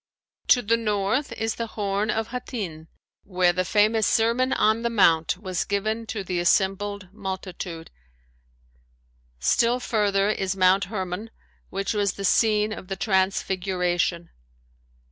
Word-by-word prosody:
To 245 - +5
the 230 +2 +2
north 210 +4 -1
is 225 0 -2
the 230 - -4
"Horn 205 +1 -1
of 220 +1 -1
Hattin," 205 - -6 0.4
where 180 -2 +2
the 185 +1 0
famous 215 +3 +2
Sermon 235 +3 +2
on 220 +2 +2
the 235 - 0
Mount 170 -8 +3
was 185 -3 -3
given 215 +3 -2
to 210 -3 -4
the 180 -1 -2
assembled 195 +2 0
multitude. 185 -4 -6 1.5
Still 235 - +2
further 205 -4 +1
is 190 -2 -2
Mount 190 +1 +4
Hermon 190 +1 -5 0.4
which 195 +3 -2
was 205 -2 0
the 200 - -5
scene 215 +1 +3
of 190 - -9
the 195 - -3
transfiguration. 185 -3 0
200 Hz, 130 wpm, -24 LUFS, 185-220 Hz, 1.5 s, To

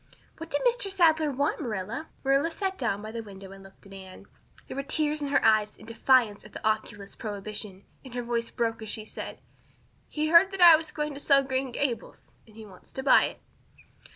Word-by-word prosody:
"What 325 0 -8
did 290 - -1
Mr. 485 -4 +1
Sadler 320 -5 +3
want, 285 +4 -1
Marilla?" 225 +4 -4 0.2
Marilla 275 +4 +2
sat 385 +2 -3
down 215 - -2
by 215 - -7
the 230 0 -5
window 195 -3 -11
and 195 0 -12
looked 195 +1 -18
at 195 - -13
Anne. 190 -1 -12 0.4
There - - -7
were 275 - -2
tears 300 +1 0
in 290 - -2
her 280 -3 +1
eyes 215 -1 +3
in 215 - -14
defiance 230 -1 +2
of 210 - -15
the - - -3
oculist's 205 -2 -3
prohibition 205 -2 -7 0.2
and 260 -3 -11
her 245 - -2
voice 235 -1 -2
broke 225 -1 -2
as 220 - -7
she 215 0 -5
said: - - -8 0.7
"He 310 0 -1
heard 340 +4 +7
that 390 - -5
I 345 -2 +10
was 315 0 -3
going 300 -1 -3
to 280 - -8
sell 275 -1 +4
Green 260 0 -2
Gables 245 -1 -4
and 215 - -19
he 220 -1 -10
wants 190 -3 -16
to 265 - -5
buy 275 - +6
it." - - -7
240 Hz, 215 wpm, -27 LUFS, 215-300 Hz, 0.7 s, I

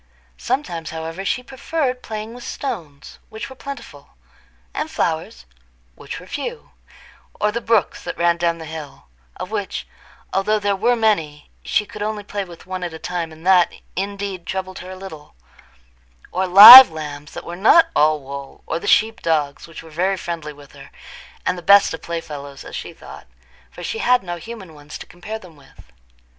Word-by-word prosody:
Sometimes, 170 - -3
however, 165 +3 -6
she 250 +5 -1
preferred 265 0 -3
playing 215 0 -6
with 245 0 -11
stones, 165 - -7
which 220 +4 -8
were - - -10
plentiful, 255 - -10 0.6
and - - -3
flowers, - - -3 0.5
which - - -8
were 180 - -13
few, 375 - -6 0.7
or 210 - +1
the 235 +2 -3
brooks 225 -4 +1
that - - -6
ran 170 0 +2
down 170 -1 0
the 160 - -9
hill, 150 -3 -9 0.3
of - - -7
which, - - -4 0.5
although 205 +3 +1
they 205 -1 0
were 230 +5 +2
many, 165 -10 -1
she 210 - 0
could 205 - -10
only 210 0 -3
play 205 0 -4
with 175 -3 -13
one 185 -1 -5
at 170 -2 -5
a - - -6
time, 170 0 -4
and 160 +2 -14
that, 185 -2 +5 0.2
indeed, 195 -2 -4
troubled 185 0 -4
her 180 - -9
a 185 - -7
little—or 60 - -10
live 215 +7 +13
lambs 150 -2 -8
that - - -8
were 170 - -6
not 220 - +5
all 155 0 +3
wool, 140 0 -9
or 165 - -3
the - - -7
sheep 220 +1 +3
dogs, 150 -3 -1
which 165 -1 -11
were 160 - -14
very 185 +5 0
friendly 165 -4 -5
with 145 -1 -16
her, - - -14 0.6
and 180 - -1
the - - -10
best 200 +2 +5
of 160 - -7
playfellows, 145 -4 -7
as - - -9
she - - -6
thought, - - -13 0.4
for - - -11
she 450 - -4
had 250 - +3
no 175 -1 -5
human 190 -2 -10
ones 145 0 -10
to - - -10
compare 205 +5 -8
them 180 -7 -15
with. 135 - -20
175 Hz, 180 wpm, -20 LUFS, 155-210 Hz, 0.7 s, live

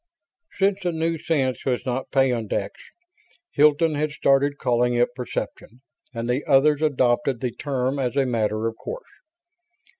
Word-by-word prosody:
Since 195 0 +2
the 180 -2 -1
new 165 0 -1
sense 135 -6 -1
was 125 -2 -1
not 130 +1 -3
peyondix, 125 -5 0 0.8
Hilton 150 +2 +3
had 150 +1 -1
started 140 0 +2
calling 120 -2 +1
it 120 0 +1
"perception" 125 -1 -6 0.3
and 115 -1 -4
the 125 +4 0
others 145 +2 +4
adopted 130 -4 +1
the 125 0 -2
term 135 +1 -2
as 125 -1 -1
a 135 - +3
matter 110 -3 -1
of 115 0 -2
course. - - -7
135 Hz, 145 wpm, -23 LUFS, 120-150 Hz, 0.8 s, others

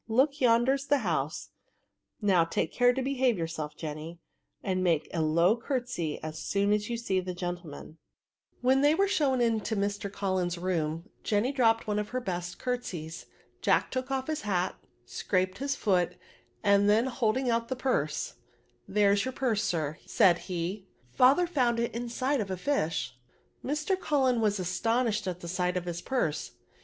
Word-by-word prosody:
Look, 270 +6 +2
yonder's 255 +3 +3
the 285 - +4
house; 155 -3 -2 0.7
now 185 -4 +4
take 165 0 -1
care 245 0 +5
to 260 +1 -2
behave 260 -4 +1
yourself, 160 -3 -4
Jenny, 155 +2 -6 0.4
and 185 -2 0
make 165 -4 +2
a 165 - 0
low 170 +6 +3
curtesy 240 - -3
as 155 0 -5
so<m 200 +3 +1
as 210 +1 -1
you 235 - -1
see 195 -5 0
the 180 -1 -5
gentleman." 175 -3 -6 0.6
When 260 +2 +4
they 295 +2 +5
were 395 +3 +3
shown 275 -9 +2
into 225 -1 +1
Mr. 200 0 -2
Cullen' 185 -3 -1
68 175 +1 -5
VSRB8. 185 -1 +1
room^ 160 0 -2 0.2
Jenny 215 +5 +1
dropped 230 -4 +3
one 210 -1 0
of 210 0 -3
her 255 - -2
best 180 -5 -4
curt* 250 -1 -2
seys. 160 -2 -7 0.3
Jack - - +2
took 260 0 -3
off 265 -1 -1
his 310 0 -3
hat^ 185 -3 0 0.3
scraped 185 - -1
his 280 +1 -1
foot^ 180 -7 +1 0.5
and 200 0 +4
then 220 +3 +4
holding 250 0 0
out 230 0 0
the 260 - -2
purse 155 - -1
— 120 0 -37
" 120 - -40
There's 200 0 +3
your 260 - -3
purse, 235 -5 0
sir," 155 -5 -1
said 175 -2 +4
he; 185 +3 -3
" 125 0 -33
father 270 +8 +5
found 250 -8 +1
it 235 - -1
inside 245 +3 -1
of 200 - -4
a 185 - -2
fish/' 165 - -1 0.5
Mr. 300 +7 -1
Cullen 265 -8 +2
was 210 -2 +1
astonished 215 +3 0
at 180 -1 -4
the 170 - -7
sight 180 +1 0
of 180 - -3
his 175 -1 -4
purse. 210 - -1
205 Hz, 180 wpm, -29 LUFS, 175-250 Hz, 0.7 s, care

